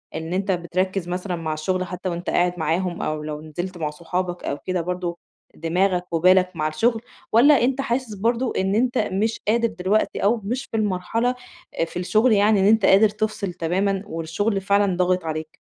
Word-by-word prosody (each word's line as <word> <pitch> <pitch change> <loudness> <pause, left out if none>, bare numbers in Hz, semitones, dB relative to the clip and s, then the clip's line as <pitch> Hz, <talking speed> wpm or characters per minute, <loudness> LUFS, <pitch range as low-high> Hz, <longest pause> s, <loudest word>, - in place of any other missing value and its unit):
إن 160 +2 -4
أنت 195 +1 0
بتركّز 185 +1 -1
مثلًا 180 +1 -3
مع 160 -2 -3
الشغل، 185 +4 -1
حتى 185 0 -5
وأنت 175 +1 -4
قاعد 175 0 +2
معاهم 175 +3 -1
أو 155 0 -2
لو 150 0 -5
نزلت 175 +4 -6
مع 155 -3 -2
صحابك 175 +3 -4
أو 140 - -2
كده 185 -2 -1
برضه 180 0 -3 0.4
دماغك 180 +2 0
وبالك 185 +2 +4
مع 155 -1 0
الشغل، 225 +9 +1 0.3
والّا 270 +4 +6
أنت 265 +2 +1
حاسس 240 -3 -2
برضه 235 +5 0
إن 190 +1 +1
أنت 250 +3 +1
مش 215 +3 0
قادر 230 +2 +3
دلوقتي 205 0 0
أو 220 +4 +3
مش 250 +6 -3
في 225 - -1
المرحلة، 215 +4 0 0.4
آآ - - +3
في 165 - -8
الشغل 215 +7 +3
يعني 205 0 +4
إن 190 - +3
أنت 215 0 +4
قادر 210 +3 +6
تفصِل 210 -3 -3
تمامًا 190 +4 -1
والشغل 195 +4 -2
فعلًا 200 -1 +2
ضاغط 180 -1 +1
عليك؟ 155 0 -5
185 Hz, 185 wpm, -23 LUFS, 175-215 Hz, 0.4 s, والّا